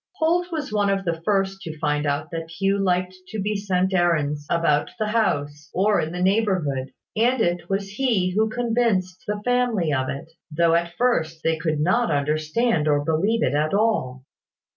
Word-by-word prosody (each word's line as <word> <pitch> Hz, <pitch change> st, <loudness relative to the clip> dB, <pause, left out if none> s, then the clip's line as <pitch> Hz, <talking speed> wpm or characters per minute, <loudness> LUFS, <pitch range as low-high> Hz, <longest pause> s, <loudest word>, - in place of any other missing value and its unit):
Holt 350 Hz, +2 st, +1 dB
was 300 Hz, -8 st, -4 dB
one 205 Hz, -1 st, +2 dB
of 195 Hz, 0 st, 0 dB
the 165 Hz, -1 st, -2 dB
first 195 Hz, +1 st, 0 dB
to 160 Hz, -4 st, -7 dB
find 150 Hz, -1 st, 0 dB
out 140 Hz, 0 st, -2 dB
that 165 Hz, -1 st, -5 dB
Hugh 195 Hz, +4 st, 0 dB
liked 185 Hz, -1 st, 0 dB
to 220 Hz, -, -5 dB
be 210 Hz, +2 st, -1 dB
sent 190 Hz, -2 st, 0 dB
errands 150 Hz, -5 st, +1 dB
about 150 Hz, -3 st, +2 dB
the 215 Hz, -, -1 dB
house, 150 Hz, -9 st, -1 dB
or 205 Hz, +3 st, +3 dB
in 155 Hz, -, -3 dB
the 180 Hz, +1 st, -2 dB
neighbourhood; 185 Hz, -10 st, +1 dB, 0.2 s
and 240 Hz, +4 st, +2 dB
it 175 Hz, -4 st, 0 dB
was 195 Hz, 0 st, -1 dB
he 210 Hz, -6 st, +1 dB
who 215 Hz, +4 st, +1 dB
convinced 225 Hz, -6 st, 0 dB
the 210 Hz, 0 st, -3 dB
family 245 Hz, -10 st, +1 dB
of 130 Hz, -1 st, 0 dB
it, 140 Hz, +4 st, -6 dB, 0.2 s
though 165 Hz, +2 st, +3 dB
at 170 Hz, 0 st, 0 dB
first 165 Hz, -10 st, 0 dB
they 165 Hz, -, +2 dB
could 160 Hz, -2 st, -2 dB
not 185 Hz, +10 st, +2 dB
understand 155 Hz, +6 st, 0 dB
or 145 Hz, -1 st, +2 dB
believe 195 Hz, +9 st, +1 dB
it 125 Hz, -, +1 dB
at 155 Hz, +5 st, +1 dB
all. 200 Hz, -, 0 dB
180 Hz, 185 wpm, -23 LUFS, 155-215 Hz, 0.2 s, or